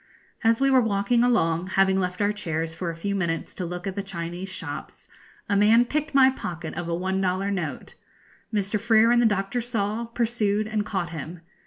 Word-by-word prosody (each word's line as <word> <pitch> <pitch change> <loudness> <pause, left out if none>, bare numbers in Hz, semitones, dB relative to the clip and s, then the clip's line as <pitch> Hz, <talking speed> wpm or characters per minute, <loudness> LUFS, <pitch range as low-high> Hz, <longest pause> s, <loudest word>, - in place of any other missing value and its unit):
As 225 0 +3
we 275 0 +3
were 260 -1 +6
walking 225 +2 +2
along, 175 -8 +2
having 190 0 +4
left 180 +1 -1
our 205 +1 +2
chairs 165 -5 -3
for 170 +1 -4
a 165 - -5
few 200 +5 -3
minutes 170 -4 -2
to 180 - -4
look 180 +1 -6
at 195 - -2
the 200 - -2
Chinese 175 0 -6
shops, 185 - -7 0.4
a 205 - +1
man 220 +4 +5
picked 300 +3 -2
my 265 -1 +7
pocket 170 -10 -6
of 170 0 -4
a 170 - 0
one 190 +2 -1
dollar 190 +2 0
note. 175 -7 -4 0.6
Mr. 210 0 0
Freer 225 +1 +4
and 240 0 +5
the 235 - +5
Doctor 200 +3 -1
saw, 225 -1 -2
pursued, 225 -3 0
and 215 -1 -2
caught 180 -4 -2
him. 165 +2 -7
200 Hz, 200 wpm, -25 LUFS, 180-225 Hz, 0.6 s, my